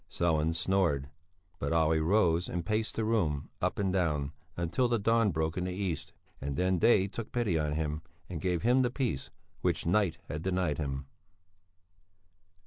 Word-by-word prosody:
Sellén 80 -1 +1
snored. 85 -7 +1 0.5
But 70 +3 -1
Olle 80 -1 +3
rose 85 0 +2
and 85 -1 -3
paced 110 +3 -1
the 110 - 0
room, 85 -11 0
up - - 0
and 95 -2 0
down, 75 -7 0 0.3
until 85 +9 +1
the 120 0 +2
dawn 115 +1 +3
broke 80 0 -1
in 90 - -2
the 90 - -2
east; 90 -4 -3 0.3
then 90 +7 0
day 95 -1 +5
took 110 +3 -6
pity 105 -9 +1
on 75 -1 0
him 75 0 -2 0.3
and 85 -4 -5
gave 90 0 0
him 125 +3 +4
the 125 - +2
peace 120 - -2 0.3
which - - 0
night 90 -1 +2
had 75 +2 -4
denied 90 -4 0
him. 70 -2 -3
85 Hz, 165 wpm, -31 LUFS, 80-100 Hz, 0.5 s, day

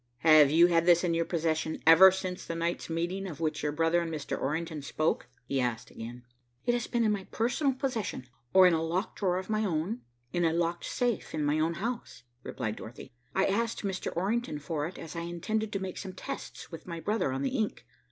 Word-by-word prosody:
"Have 155 -3 +7
you 165 +4 +6
had 170 -1 +3
this 175 0 +6
in 175 -2 +1
your 165 0 +1
possession 160 -2 -1
ever 165 +4 +10
since 185 -1 -4
the 165 - -4
night's 170 +1 -2
meeting 175 +4 -2
of 155 -6 -7
which 160 -2 -1
your 150 - 0
brother 165 +3 +2
and 165 -1 -3
Mr. 150 -3 -3
Orrington 160 +2 -2
spoke?" 155 +3 -1 0.2
he 135 +1 0
asked 120 -2 -2
again. 120 +2 -8 0.4
"It 240 - +3
has 240 -1 -1
been 240 -1 +1
in 215 - +3
my 200 -2 -2
personal 265 +5 0
possession, 250 - -3 0.3
or 190 -1 +8
in 180 - +6
a 160 - +1
locked 175 +6 -2
drawer 185 -3 +1
of 185 - -4
my 215 0 0
own, 190 +5 -1 0.3
in 175 - +1
a 165 -1 +3
locked 170 0 -1
safe 240 -9 -1
in 150 -1 0
my 145 +2 +2
own 165 +2 +1
house," 235 - -4 0.2
replied 110 -2 -4
Dorothy. 115 +2 -10 0.2
"I 190 - +3
asked 230 +4 0
Mr. 195 -2 -2
Orrington 205 -1 0
for 150 +1 -3
it, 180 - -9
as 165 +1 -8
I - - -2
intended 180 +6 -2
to 195 - -1
make 190 -1 -5
some 190 -2 -6
tests 185 - -7
with 165 - -9
my 170 -1 -5
brother 205 -4 0
on 135 +1 -2
the 255 - -1
ink. 215 - -2
170 Hz, 220 wpm, -30 LUFS, 160-195 Hz, 0.4 s, ever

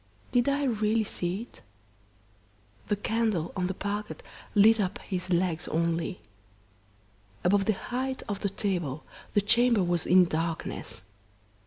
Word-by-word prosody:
Did 245 +2 +3
I 285 +1 +1
really 220 -3 +1
see 185 +1 -3
it? - - -17 1.3
The 205 - +2
candle 210 -5 -1
on 180 -1 0
the 190 - -3
parquet 205 +2 -3 0.4
lit 220 +2 +6
up 190 -1 0
his 185 -2 -3
legs 175 -2 +1
only. 170 +2 -1 1.2
Above 195 +2 +3
the 215 - +3
height 260 +5 -3
of 205 -2 -3
the 200 - -1
table 175 -8 -2 0.3
the 205 - +5
chamber 235 0 +4
was 175 -1 0
in 185 0 +7
darkness. 165 - -3
200 Hz, 135 wpm, -28 LUFS, 175-220 Hz, 1.3 s, in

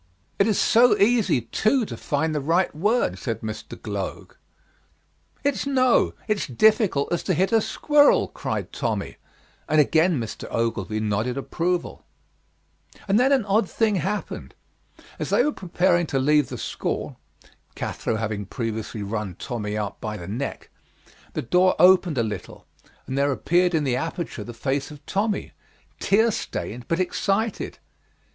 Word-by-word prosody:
"It 200 - +4
is 215 - +2
so 240 +2 +5
easy, 210 - +3
too, 220 - +1
to - - -6
find 155 +2 -1
the 150 - -1
right 165 +4 +1
word," 210 +10 +1
said - - -3
Mr. - - -7
Gloag. - - -5 1.1
"It's 280 -1 0
no; 255 -3 +3
it's 215 -2 0
difficult 190 - +3
as 175 - 0
to 185 - 0
hit 190 +6 +1
a 225 -1 +4
squirrel," 295 +5 +4
cried - - -4
Tommy, - - -3 0.5
and 155 - +4
again 160 +1 +3
Mr. 115 -2 -6
Ogilvy 110 -2 -1
nodded 110 +4 -1
approval. 175 +5 -2 1.0
And 200 +3 +3
then 260 +3 +4
an 265 -6 +3
odd 200 -1 +2
thing 220 -3 +1
happened. 195 +5 -4 0.6
As - - -3
they - - +4
were 300 - +1
preparing 175 - +1
to 135 - -1
leave 150 +2 +3
the - - -5
school - - -4 0.6
[Cathro - - -3
having 110 -2 -3
previously 110 -2 -4
run 100 -3 -4
Tommy 105 -3 -4
out 105 -2 -4
by 105 -1 -4
the 85 -3 -8
neck], 120 +8 -5 0.6
the - - -3
door 180 +8 +3
opened 180 -3 +5
a 115 - +2
little 105 -5 -6 0.4
and 130 - -4
there 140 0 +2
appeared 175 +5 +2
in 155 - +1
the 125 -3 0
aperture 165 -5 -4
the 120 - -8
face 135 +3 -2
of 150 -1 -13
Tommy, 205 +1 -1 0.5
tear 220 +4 +3
stained 125 - -5
but 165 - 0
excited. 200 +4 -1
165 Hz, 150 wpm, -24 LUFS, -, 1.1 s, so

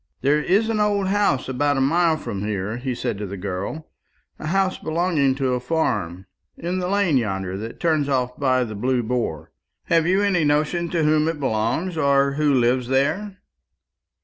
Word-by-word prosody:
"There 145 +3 +2
is 200 +8 +2
an 225 -1 -1
old 205 -2 +1
house 200 -10 +1
about 145 +2 0
a - - +1
mile 160 +4 +2
from 100 -9 -5
here," 105 +1 -3
he 125 0 -3
said 100 - -3
to 105 - -4
the 100 +1 -6
girl; 100 +11 -5 0.5
"a 155 - -5
house 190 +2 +1
belonging 155 -5 +1
to 130 -2 0
a 125 - 0
farm, 105 - -2 0.3
in 180 +2 -3
the 180 - -2
lane 190 -6 +2
yonder 95 -5 -2
that 110 +2 -7
turns 155 -4 +1
off 125 -2 0
by 130 -2 +1
the 110 -3 -6
Blue 125 +4 0
Boar. 110 -10 -3 0.3
Have 165 -1 +2
you 190 +3 +3
any 185 -5 +2
notion 155 +4 +1
to 165 -2 0
whom 155 0 +3
it 165 -2 -2
belongs, 135 +8 -1
or 140 -1 +3
who 145 +1 +1
lives 125 -1 +2
there?" 185 +10 0
140 Hz, 185 wpm, -22 LUFS, 120-170 Hz, 0.5 s, you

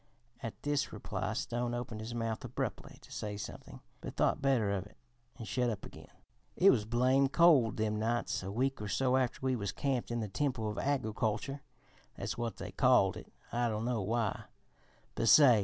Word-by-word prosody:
At 110 -2 -6
this 145 0 0
reply - - -3
Stone 120 0 -2
opened 120 -3 -5
his 115 +2 -5
mouth 115 -1 -2
abruptly - - -4
to - - -17
say 105 -1 -4
something, 100 - -8 0.2
but - - -7
thought - - +2
better 130 -7 +2
of 95 -2 -2
it - - -22 0.4
and 115 - -7
shut 125 -1 +1
up 110 - -4
again. - - -12 0.5
"It 195 +2 +7
was 110 -5 +1
blame 130 +4 +3
cold 140 -9 +5
them 105 -1 0
nights 115 -1 0
a 95 +1 -5
week 130 +3 0
or 105 - -3
so 130 +4 +2
after 130 -1 +1
we 130 -1 +2
was 100 -4 -2
camped 135 -4 -1
in 120 0 -1
the 110 - -2
Temple 125 +1 -1
of 105 - -5
Agriculture 130 0 -1 0.5
(that's 100 +4 -4
what 120 -2 -3
they - - -6
called - - +4
it - - -10 0.2
I 120 0 +1
dunno 110 +1 -1
why), 110 +1 -1 0.7
but 115 - +1
say! 130 -7 +8
120 Hz, 190 wpm, -33 LUFS, 110-130 Hz, 0.7 s, say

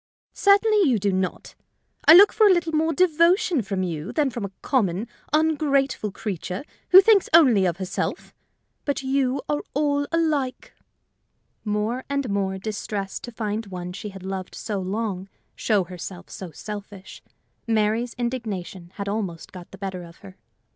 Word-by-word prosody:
"Certainly 405 0 +4
you 240 - +3
do 200 -1 0
not: 185 -1 -3 0.5
I 320 - +11
look 400 +3 +8
for 435 - +5
a - - +6
little 345 -3 +1
more 320 +1 +2
devotion 350 - +3
from 195 -2 -3
you 165 +1 -4
than 290 -4 +1
from 235 -2 -5
a 200 - -3
common, 210 -5 0 0.2
ungrateful 285 -7 +1
creature 185 - -5 0.3
who 375 +1 +10
thinks 405 -1 +4
only 240 - +6
of 170 -1 -2
herself. 185 -1 -4 0.5
But 285 -1 -2
you 265 0 0
are 295 0 -1
all 285 -1 +1
alike." 305 -6 -1 0.9
More 215 +4 -1
and 280 -5 -1
more 195 -1 -1
distressed 200 -1 -5
to 240 - -9
find 220 -1 -3
one 180 -2 -6
she 205 +3 -6
had 195 -2 -11
loved 190 -1 -5
so 205 -3 -4
long 195 0 -3 0.3
show 210 -4 +1
herself 180 +1 -9
so 185 - -7
selfish, 200 +2 -9 0.5
Mary's 225 +2 0
indignation 210 -8 -5
had 200 -1 -5
almost 200 -5 -4
got 180 -2 -11
the 195 - -12
better 190 -2 -5
of 170 -1 -13
her. 190 -1 -12
215 Hz, 155 wpm, -24 LUFS, 190-285 Hz, 0.9 s, I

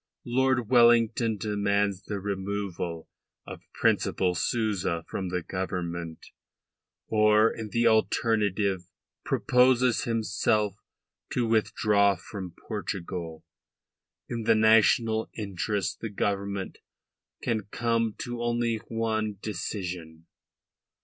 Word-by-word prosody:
Lord 130 -1 +1
Wellington 115 -2 +4
demands 100 -2 0
the 100 -2 -3
removal 95 -4 -4 0.4
of - - -9
Principal 90 -1 +1
Souza 90 -3 -1
from 95 -2 -4
the 90 -1 -2
Government, 85 -3 -4 0.9
or, 110 0 +4
in 110 -2 -6
the 120 +2 +1
alternative, 105 -4 +2 0.4
proposes 125 -1 +3
himself 105 -2 +1 0.6
to 125 - +1
withdraw 105 -2 +2
from 95 -5 -8
Portugal. 90 -6 -5 0.8
In 115 -2 -4
the - - +5
national 110 +1 +4
interest 100 -1 -2
the 115 - -4
Government 100 -1 -2 0.6
can 110 -4 -1
come 115 0 0
to 120 -1 -5
only 120 -1 0
one 110 -2 -1
decision. 90 -5 -5
105 Hz, 95 wpm, -27 LUFS, 95-115 Hz, 0.9 s, the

